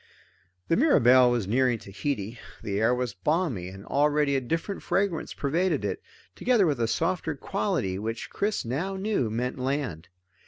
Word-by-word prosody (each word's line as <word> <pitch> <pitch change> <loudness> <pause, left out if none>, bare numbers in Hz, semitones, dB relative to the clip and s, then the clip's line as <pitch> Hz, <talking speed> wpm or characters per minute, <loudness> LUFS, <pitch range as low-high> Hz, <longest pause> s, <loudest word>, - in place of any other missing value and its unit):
The - - +3
Mirabelle 130 - +6
was 120 -4 0
nearing 125 +2 +2
Tahiti. 105 +2 -4 0.2
The 100 -1 -2
air 115 +3 +3
was 125 -1 -2
balmy, 140 - -1
and 95 +2 -10
already 145 0 +2
a 135 - +1
different 165 - -3
fragrance 195 -5 -1
pervaded 155 - 0
it, 95 - -3 0.3
together 235 - +3
with 145 -6 0
a 115 - +1
softer 165 +3 -1
quality 95 -7 -1
which 115 +2 -4
Chris 205 - -1
now 160 +12 -2
knew 190 - 0
meant 125 +4 -2
land. 130 - -2
130 Hz, 155 wpm, -27 LUFS, 110-165 Hz, 0.3 s, Mirabelle